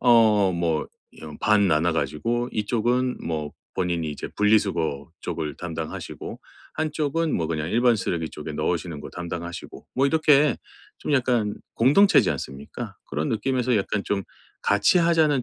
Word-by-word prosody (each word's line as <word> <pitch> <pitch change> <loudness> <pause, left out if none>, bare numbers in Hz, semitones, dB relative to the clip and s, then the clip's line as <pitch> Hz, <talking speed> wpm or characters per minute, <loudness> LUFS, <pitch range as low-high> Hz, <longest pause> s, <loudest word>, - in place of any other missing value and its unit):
어 110 -5 +5
뭐 85 -3 0 0.4
여 75 -1 -8
반 105 -2 +4
나눠 80 +1 +2
가지고 115 +10 -1
이쪽은 120 +4 0
뭐 75 -2 -3 0.2
본인이 85 -4 -1
이제 75 - -6
분리수거 95 -9 +1
쪽을 80 -4 -4
담당하시고 80 -2 -6 0.3
한쪽은 155 0 -1
뭐 80 - -1
그냥 80 0 -2
일반 120 +1 +4
쓰레기 85 -5 -2
쪽에 75 +1 -7
넣으시는 80 0 -2
거 - - -8
담당하시고. 85 0 -7
뭐 135 - +2
이렇게 150 -2 +4 0.4
좀 - - -3
약간 120 -6 +2 0.2
공동체지 170 - +5
않습니까? 70 +1 -6
그런 75 +2 -2
느낌에서 125 +1 +1
약간 100 0 -1
좀 100 -1 -1 0.4
같이 105 - +4
하자는 160 -5 +3
100 Hz, 315 characters per minute, -24 LUFS, 80-125 Hz, 0.4 s, 어